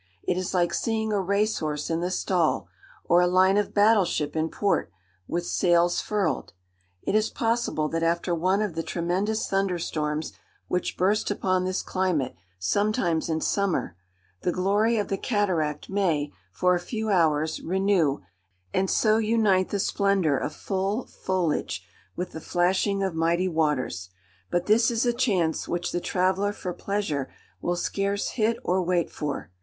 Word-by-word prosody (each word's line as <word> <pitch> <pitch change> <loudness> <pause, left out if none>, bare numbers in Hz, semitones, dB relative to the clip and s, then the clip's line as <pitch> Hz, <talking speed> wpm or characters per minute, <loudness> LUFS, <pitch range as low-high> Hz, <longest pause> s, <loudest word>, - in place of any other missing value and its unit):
It 180 - 0
is 185 0 -2
like 175 -1 +2
seeing 220 -1 -1
a 200 - +2
race 200 +3 +1
horse 150 0 -3
in 165 - 0
the 175 - -1
stall, 180 -3 0 0.4
or 175 +1 +5
a 180 - +4
line 185 +2 +4
of 205 0 +1
battle 210 0 +5
ship 150 -4 -2
in 160 0 0
port, 200 - 0 0.4
with 175 0 -2
sails 175 0 +2
furled. 210 -2 -1 0.5
It - - -1
is 215 +1 +2
possible 230 - 0
that 165 - -2
after 170 +1 +1
one 185 +5 +1
of 205 -5 -3
the 165 - -2
tremendous 185 +7 -1
thunder 195 -2 0
storms 155 -2 -2 0.3
which 180 - -2
burst 200 +4 +2
upon 185 -2 0
this 185 0 -1
climate 180 -9 0 0.2
sometimes 175 - 0
in 160 0 0
summer, 195 - 0 0.5
the 180 - 0
glory 205 +6 +2
of 205 - -1
the 195 - -1
cataract 175 -9 0
may, 165 -7 0 0.2
for 180 - +2
a 175 - +1
few 220 +4 -3
hours, 160 -3 +2
renew, 185 - +1 0.5
and 190 0 +1
so 215 0 +3
unite 215 -4 +2
the 205 - -1
splendour 195 -6 +2
of 145 - -2
full 195 +5 -2
foliage 180 -5 -2 0.3
with 180 0 -4
the 160 - -7
flashing 190 +4 +1
of 190 -2 -1
mighty 170 +3 +1
waters: 150 - -1 0.4
but 175 0 0
this 225 +4 +4
is 235 0 0
a 240 - +2
chance 195 -10 0
which 175 0 -2
the 175 - -2
traveller 190 +3 +1
for 180 -3 -5
pleasure 185 -11 -2 0.3
will 175 - 0
scarce 200 +3 -1
hit 225 0 +1
or 185 +1 +1
wait 175 -1 0
for. 145 -9 -4
185 Hz, 165 wpm, -26 LUFS, 165-205 Hz, 0.5 s, or